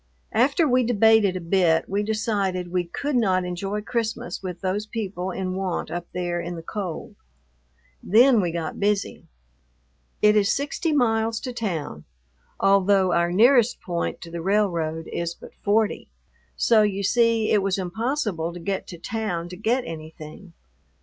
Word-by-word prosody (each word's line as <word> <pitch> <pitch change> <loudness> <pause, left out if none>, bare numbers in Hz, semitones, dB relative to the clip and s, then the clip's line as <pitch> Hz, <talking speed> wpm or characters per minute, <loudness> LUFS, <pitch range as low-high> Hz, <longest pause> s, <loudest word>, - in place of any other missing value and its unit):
After 275 +8 +3
we 255 -1 +3
debated 220 -4 +4
a - - -2
bit 170 -2 +2
we 200 +2 -1
decided 205 -4 -1
we 180 -1 0
could 280 +11 -3
not 190 -6 +2
enjoy 195 +4 -3
Christmas 230 +1 -3
with 180 -2 -6
those 200 +3 -2
people 195 -5 -4
in 185 0 -3
want 185 -2 -3
up 175 0 -4
there 175 -1 -2
in 175 +1 -5
the 165 - -8
cold. 185 -2 -5 0.9
Then 235 +3 +5
we 175 -2 -1
got 165 -1 -4
busy. 205 0 -1 1.0
It 210 0 +6
is 205 -1 +3
sixty 290 +4 -1
miles 225 -5 +1
to 255 -2 -5
town, 165 - -4 0.5
although 195 -1 +3
our 170 0 +2
nearest 240 +4 +4
point 170 -2 -3
to 165 - -9
the 170 0 -5
railroad 170 -5 0
is 170 0 -3
but - - -13
forty, 210 +1 0 0.5
so 225 -2 +4
you 200 -1 0
see 230 +1 +2
it 210 - +4
was 195 0 0
impossible 195 - -2
to 175 - -8
get 195 +2 -3
to 175 - -8
town 175 -3 -3
to 180 - -8
get 230 +6 0
anything. 160 +2 -9
195 Hz, 155 wpm, -24 LUFS, 175-220 Hz, 1.0 s, It